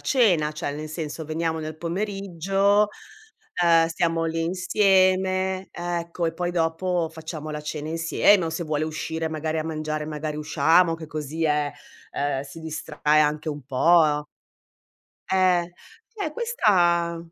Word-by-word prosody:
cena, 180 - +2
cioè 150 -2 -4
nel 155 +1 -6
senso, 155 0 -5
veniamo 160 +1 -2
nel 155 0 -6
pomeriggio, 195 +3 0 0.7
ehm, 165 -1 +5
stiamo 165 0 0
lì 165 0 -1
insieme, 185 +1 +2
ecco, 175 0 -3
e 165 - -2
poi 175 +1 -2
dopo 170 0 0
facciamo 160 -1 -7
la 150 0 -5
cena 150 0 -5
insieme". 165 +3 +3
O 160 - -2
se 160 +2 -3
vuole 155 -1 -1
uscire 160 +1 -3
magari 155 0 -2
a 155 - -2
mangiare 155 -1 -3
magari 150 0 -4
usciamo, 160 +3 +3
che 160 -1 -8
così 155 +1 -4
eh, 150 -1 +1 0.4
uhm, 140 -1 -1
si 150 +4 -11
distrae 155 -1 0
anche 150 +1 +1
un 145 -1 -5
po'. 150 +2 +3 1.1
Eh. 180 -2 +3 0.4
Cioè 405 -9 -4
questa 175 - +2
165 Hz, 140 wpm, -24 LUFS, 155-180 Hz, 1.1 s, ehm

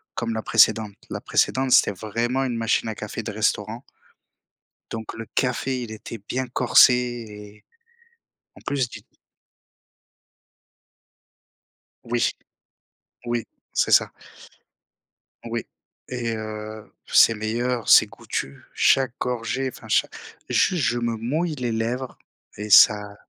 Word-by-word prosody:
comme 115 -1 -2
la 110 - -3
précédente. 110 -2 +3
La - - -4
précédente, 130 0 +1
c'était - - +5
vraiment 115 +6 -2
une 120 -2 -2
machine 115 0 0
à 110 - -4
café 105 +2 -6
de 110 - -5
restaurant 110 +2 -1 1.1
donc 110 -1 -6
le 115 0 -7
café, 125 0 -1
il 110 - -8
était 110 +1 -8
bien 130 0 -2
corsé 125 +1 +5
et 110 -4 -6 0.9
en - - -15
plus 135 -3 0
du - - -11 3.0
Oui. 120 0 0 1.0
Oui, 120 -1 -1 0.3
c'est - - +1
ça. - - +5 1.4
Oui 115 0 -4 0.5
et 120 -2 -2
heu, 110 0 -7
c'est 115 - +5
meilleur, 115 +2 -2
c'est - - +7
goûtu. 70 0 -6
Chaque 130 -2 +3
gorgée, 125 +2 -2
enfin - - -13
cha - - +2 0.4
juste, 175 -7 +2
je 120 -1 +1
me 115 -1 -1
mouille 150 +8 -2
les 125 -3 -3
lèvres 120 +3 -3 0.4
et 105 +1 -6
ça 105 0 +6
115 Hz, 120 wpm, -23 LUFS, 110-125 Hz, 3.0 s, c'est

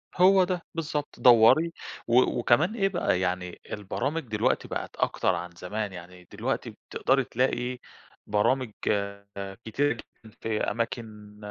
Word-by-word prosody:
هو 190 +1 +6
ده 180 -1 -1
بالضبط، 150 -2 -3
دوّري 125 +8 +6 0.4
و 120 +2 +6 0.2
وكمان 155 - +3
إيه 195 -4 +2
بقى، 175 - +1
يعني 90 -1 -2
البرامج 130 +10 -2
دلوقتي 110 +1 0
بقِت - - -5
أكتر 95 - +1
عن 90 +1 -5
زمان 100 +4 -4
يعني 90 0 -11
دلوقتي - - -2
بتقدَري 135 0 0
تلاقي 125 0 -1 0.5
برامج 115 +4 +1 0.9
كتيرة 145 +6 +1
جدًا 110 -1 -15
في 110 -1 -1
أماكن 110 -2 -4
115 Hz, 125 wpm, -27 LUFS, 105-145 Hz, 0.9 s, هو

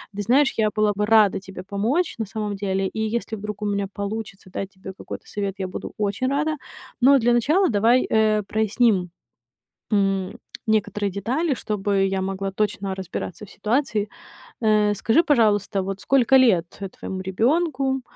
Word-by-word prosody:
Ты 205 - -2
знаешь, 265 +7 +3
я 215 -1 +3
была 210 0 +1
бы 210 +1 -1
рада 215 -3 +4
тебе 190 -1 -9
помочь 225 - -1
на 225 - -2
самом 210 0 -4
деле, 195 -1 -1
и 220 - -6
если 225 -1 -3
вдруг 210 +1 -6
у - - -2
меня 200 -1 -1
получится 200 -2 -6
дать 195 +1 -5
тебе 190 -1 -10
какой-то - - -8
совет, 200 -2 -3
я 190 -1 -3
буду 185 - -7
очень 210 +5 -1
рада. 305 +3 0 0.5
Но 275 +2 +7
для 240 0 +3
начала 310 - +3
давай, 230 +4 +3
э, 215 -1 +3
проясним, 215 -4 +1 0.8
м, 195 +1 +1 0.3
некоторые 205 -1 +1
детали, 260 - -1
чтобы 200 -4 0
я 190 0 -1
могла 195 0 -3
точно 195 -1 -2
разбираться 190 +2 -6
в - - -17
ситуации. 215 -1 -1 0.5
Э, 215 -2 +3
скажи, 225 - +3
пожалуйста, 210 - +2
вот 195 +1 -5
сколько 265 -1 +3
лет 205 -10 +4 0.3
твоему 190 0 -5
ребёнку? 265 - 0
210 Hz, 160 wpm, -23 LUFS, 195-235 Hz, 0.8 s, Но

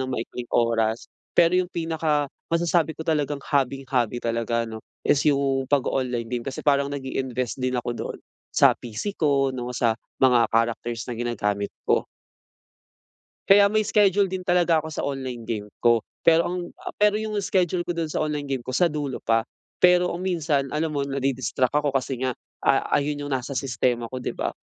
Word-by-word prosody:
ng 130 - -2
maikling 120 +1 -5
oras 115 -1 +1 0.3
pero 170 0 +5
yung 180 -1 +1
pinaka-masasabi 165 0 0
ko - - -10
talagang 150 -3 0
hobby-hobby 130 -4 0
talaga 115 0 -1
'no, 110 0 -7 0.2
is 140 - +3
yung 135 -2 +1
pag-oonline 125 -4 0
game 120 0 -3
kasi 135 -1 -5
parang 140 -1 +3
nag-iinvest 130 -3 -3
din 130 0 0
ako 120 0 -2
dun, - - -5 0.3
sa - - +6
PC 120 - -5
ko 140 -3 +2
'no, 125 -1 -4
sa 115 -2 +1 0.2
mga 125 -3 +5
characters 115 0 0
na - - -2
ginagamit 105 -4 -1 0.2
ko. - - +2 1.4
Kaya 200 +1 +7
may 215 -1 +1
schedule 200 -2 +4
din 185 0 -4
talaga 175 -3 +3
ako 160 - -6
sa 150 - -3
online 130 -4 -4
game 105 -2 -4
ko, 120 -2 +3 0.2
pero 165 +1 +5
ang 180 -1 -5 0.2
pero 210 0 +4
yung 215 0 -2
schedule 180 -3 0
ko 175 - -2
dun 165 -2 -2
sa - - -2
online 145 -2 -3
game 130 -3 -1
ko, 130 - -4
sa 175 +2 +3
dulo 145 -3 -4
pa. 115 0 +2 0.3
Pero 180 0 +5
kung 180 +2 -4
minsan, 155 -6 0
alam 155 +1 0
mo, 140 -2 -1
nadi-distract 135 -2 0
ako 145 -1 0
kasi 130 -1 -1
nga 125 - -1 0.3
a - - +3
ayun 145 0 -2
yung 140 - -4
nasa 130 +1 -2
sistema 125 -3 -1
ko, 130 - -4
di 125 - -4
ba? - - -2
135 Hz, 175 wpm, -24 LUFS, 120-165 Hz, 1.4 s, Kaya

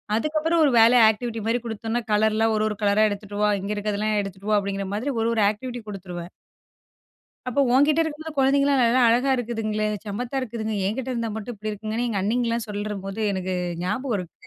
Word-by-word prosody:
அதுக்கப்புறம், 310 +6 +1
ஒரு 275 - +3
வேலையா 230 +1 +7
ஆக்டிவிட்டி 230 +1 -5
மாரி 235 +2 +1
குடுத்தோம்னா, 225 +1 -3
கலர்லாம் 220 +1 +2
ஒரு 215 - +1
ஒரு 210 - -5
கலரா 205 +2 +4
எடுத்துட்டு 205 0 -6
வா 210 - +4
இங்கே 205 +2 -3
இருக்றதெல்லாம் 210 0 -1
எடுத்துட்டு 195 +2 -6
வா 210 - +5
அப்டிங்கிற 195 -1 -3
மாதிரி 260 +7 -2
ஒரு 230 - +1
ஒரு 215 - +3
ஆக்டிவிட்டி 245 +2 -7
குடுத்துருவேன். 180 -3 -7 1.2
அப்ப 280 +3 +2
ஒன்கிட்ட 295 +4 +4
இருக்கும்போது 315 -1 -6
குழந்தைங்கலாம் 275 0 +3
நல்லா 240 +2 +3
அழகா 250 +4 +3
இருக்குதுங்களே. 215 -3 -2 0.2
சம்மத்தா 240 +6 -4
இருக்குதுங்க. 220 -3 -4
என்கிட்ட 255 +5 -2
இருந்தா 230 -2 -2
மட்டும் 220 +2 -6
இப்படி 215 +1 -4
இருக்குங்கன்னு. 220 +3 -3
எங்க 200 -4 -1
அண்ணிங்கலாம் 230 +2 0
சொல்றபோது 205 0 -4
எனக்கு 185 -1 -2 0.3
ஞாபகம் 215 +5 -1
இருக்கு 175 -1 -10
220 Hz, 175 wpm, -24 LUFS, 205-245 Hz, 1.2 s, வேலையா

